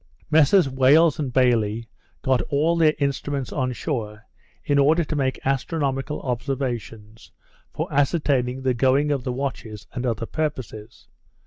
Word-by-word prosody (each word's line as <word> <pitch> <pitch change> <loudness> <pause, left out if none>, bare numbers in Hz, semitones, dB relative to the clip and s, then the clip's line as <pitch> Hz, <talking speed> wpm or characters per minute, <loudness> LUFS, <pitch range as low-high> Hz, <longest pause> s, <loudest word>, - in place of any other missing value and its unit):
Messrs 160 +3 +5
Wales 140 +5 +4
and 140 -4 -2
Bayley 115 -3 +1 0.4
got 130 -1 +2
all 155 +3 +2
their 160 -2 +3
instruments 140 -1 -2
on 130 -3 -1
shore, 110 -6 -4 0.4
in 140 0 +1
order 155 +5 +4
to 155 - -4
make 135 -2 -1
astronomical 135 +1 -1
observations 120 -4 -5 0.4
for - - -3
ascertaining 135 -3 +1
the 130 -1 +2
going 135 +4 +2
of 140 -3 -1
the 125 - -2
watches, 125 -5 -5
and 125 - -4
other 115 -1 -2
purposes. 120 -7 -5
135 Hz, 135 wpm, -23 LUFS, 125-145 Hz, 0.4 s, Messrs